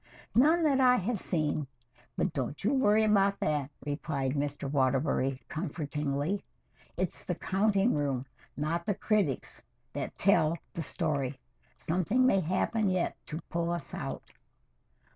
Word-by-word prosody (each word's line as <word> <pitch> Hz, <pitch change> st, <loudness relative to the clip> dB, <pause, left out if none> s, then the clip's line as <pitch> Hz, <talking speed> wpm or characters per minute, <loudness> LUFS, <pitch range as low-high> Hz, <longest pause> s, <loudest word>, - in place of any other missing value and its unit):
"None 315 Hz, +7 st, +5 dB
that 280 Hz, -4 st, +3 dB
I 250 Hz, -1 st, +6 dB
have 225 Hz, -1 st, -1 dB
seen 155 Hz, -5 st, 0 dB, 0.5 s
but 180 Hz, -, 0 dB
don't 140 Hz, +4 st, -3 dB
you 225 Hz, +7 st, +2 dB
worry 220 Hz, -5 st, +4 dB
about 200 Hz, -2 st, +3 dB
that," 145 Hz, -3 st, 0 dB, 0.2 s
replied 145 Hz, -2 st, -2 dB
Mr. 145 Hz, 0 st, -2 dB
Waterbury 135 Hz, -1 st, +1 dB
comfortingly. 150 Hz, +1 st, -2 dB, 0.5 s
"It's -, -, -2 dB
the -, -, -2 dB
counting 200 Hz, +3 st, +2 dB
room, 140 Hz, -3 st, -1 dB, 0.3 s
not 165 Hz, +4 st, -1 dB
the 205 Hz, -, +1 dB
critics, 195 Hz, -, 0 dB, 0.3 s
that -, -, -4 dB
tell 155 Hz, +2 st, +3 dB, 0.2 s
the 170 Hz, -, -3 dB
story. 140 Hz, -4 st, -1 dB, 0.4 s
Something 185 Hz, +10 st, +1 dB
may 195 Hz, -7 st, +4 dB
happen 190 Hz, +5 st, +1 dB
yet 185 Hz, -2 st, 0 dB
to 155 Hz, +2 st, -5 dB
pull 170 Hz, 0 st, 0 dB
us 175 Hz, 0 st, -4 dB
out." -, -, -4 dB
165 Hz, 135 wpm, -30 LUFS, 145-205 Hz, 0.5 s, I